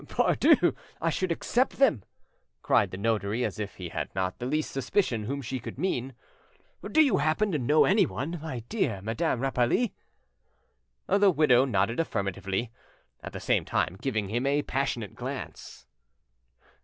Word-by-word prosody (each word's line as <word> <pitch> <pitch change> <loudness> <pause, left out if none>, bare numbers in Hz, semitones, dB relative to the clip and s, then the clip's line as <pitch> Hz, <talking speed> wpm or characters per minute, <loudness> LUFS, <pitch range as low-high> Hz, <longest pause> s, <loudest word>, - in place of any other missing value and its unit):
"Pardieu! - - +3 0.3
I 165 0 0
should 185 +2 -1
accept 245 +9 +1
them," 250 - +3 0.6
cried - - +3
the 95 - -7
notary 110 +2 0
as 110 -2 -4
if 105 -1 -5
he 90 -2 -7
had - - -4
not 95 -1 -2
the 125 - -3
least 155 +3 -1
suspicion 130 - 0
whom 140 +4 -3
she 130 +2 -4
could - - -8
mean. 135 -9 -2 0.7
"Do 315 - +4
you 280 - +2
happen 155 +8 +1
to 155 - 0
know 145 +5 +4
anyone, 175 -5 +1
my 140 -7 -5
dear 120 - -2
Madame 120 +4 -1
Rapally?" 135 - +1 1.1
The 200 0 +4
widow 145 -7 +4
nodded 115 0 0
affirmatively, 100 - -2 0.5
at - - -7
the - - -6
same - - +1
time 90 - -1
giving 110 -7 -1
him 120 +5 -1
a 145 +1 +2
passionate 125 -7 -2
glance. - - -7
130 Hz, 155 wpm, -28 LUFS, 110-160 Hz, 1.1 s, Do